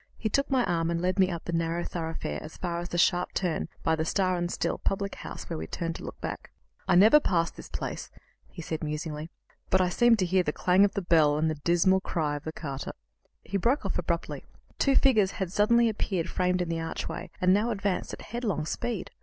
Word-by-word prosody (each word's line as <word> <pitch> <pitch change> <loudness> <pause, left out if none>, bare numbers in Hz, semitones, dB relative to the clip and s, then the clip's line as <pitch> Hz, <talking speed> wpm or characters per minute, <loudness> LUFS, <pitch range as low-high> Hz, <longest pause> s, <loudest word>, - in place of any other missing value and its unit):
He 220 - -2
took 275 +6 +1
my 260 -3 +2
arm 165 -1 0
and 170 0 0
led 185 +3 0
me 185 -1 +5
up 170 -3 -4
the 175 - -3
narrow 165 +1 0
thoroughfare 160 - -4
as 155 - -10
far 170 -2 -2
as 175 +1 -5
the 175 - -3
sharp 175 +1 +2
turn 180 -4 -1
by 160 - +2
the 160 - -1
"Star 185 +2 +1
and 175 0 -2
Still" - - -1
public 200 0 -1
house, - - -8
where - - -4
we 80 - -5
turned 165 - -3
to - - -10
look - - -8
back. - - -5 0.4
"I 185 - +4
never 215 +11 +8
pass 170 - +1
this - - -11
place," - - -5 0.4
he 170 - -9
said 160 0 -4
musingly, 150 +1 -4 0.4
"but 190 - +4
I 185 -1 +2
seem 240 +5 +5
to 195 -4 0
hear 185 +1 +3
the 150 - -1
clang 185 +2 +4
of 205 - +3
the 200 - -2
bell 155 -4 +4
and 155 +1 +1
the 150 -2 -6
dismal 175 +2 +3
cry 155 -6 -1
of 145 - -7
the 160 - -3
carter 140 -4 -5 0.3
" - - -41
He 200 - -2
broke 240 +9 +1
off - - -1
abruptly. - - -3 0.4
Two 275 -1 +3
figures 220 -9 +4
had 190 -3 -3
suddenly 235 +4 +4
appeared 195 -5 -1
framed 180 0 +1
in 170 - -6
the 165 0 -1
archway, 165 0 -5
and 185 0 +4
now 210 +4 +2
advanced 200 -4 -1
at - - -8
headlong 215 -9 -2
speed. 220 +5 -3
180 Hz, 235 wpm, -28 LUFS, 165-200 Hz, 0.4 s, never